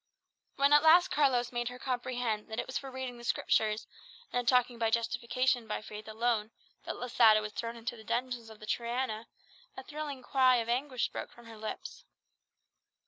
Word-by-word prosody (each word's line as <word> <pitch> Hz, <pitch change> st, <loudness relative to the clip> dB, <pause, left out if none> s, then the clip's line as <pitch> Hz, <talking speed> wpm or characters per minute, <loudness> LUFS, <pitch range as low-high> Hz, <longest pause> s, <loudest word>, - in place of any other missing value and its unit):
When 280 Hz, +1 st, +4 dB
at 295 Hz, -, +8 dB
last 335 Hz, +3 st, +6 dB
Carlos 255 Hz, -5 st, +2 dB
made 240 Hz, -1 st, -1 dB
her 250 Hz, -, -9 dB
comprehend 245 Hz, -4 st, -2 dB
that 220 Hz, 0 st, -4 dB
it -, -, -2 dB
was 260 Hz, -, -8 dB
for 270 Hz, -, -3 dB
reading 260 Hz, -2 st, -6 dB
the -, -, -11 dB
Scriptures, 215 Hz, -2 st, +1 dB, 0.5 s
and 245 Hz, -1 st, -1 dB
talking 250 Hz, -2 st, +3 dB
of 225 Hz, -1 st, +2 dB
justification 235 Hz, +1 st, 0 dB
by 210 Hz, -, -3 dB
faith 215 Hz, 0 st, -9 dB
alone, 220 Hz, -1 st, 0 dB, 0.4 s
that -, -, -3 dB
Losada 230 Hz, -3 st, +5 dB
was 210 Hz, 0 st, -5 dB
thrown 230 Hz, 0 st, -4 dB
into 235 Hz, +1 st, -5 dB
the 220 Hz, -, -12 dB
dungeons 235 Hz, 0 st, -2 dB
of 220 Hz, -1 st, -13 dB
the 215 Hz, -, -10 dB
Triana, 235 Hz, 0 st, -2 dB, 0.5 s
a 265 Hz, -, -6 dB
thrilling 290 Hz, -2 st, -6 dB
cry 255 Hz, -1 st, +4 dB
of 230 Hz, -2 st, 0 dB
anguish 255 Hz, +1 st, 0 dB
broke -, -, -6 dB
from 240 Hz, -, -16 dB
her 230 Hz, -1 st, -10 dB
lips. 220 Hz, -, -6 dB
240 Hz, 185 wpm, -31 LUFS, 225-255 Hz, 0.5 s, at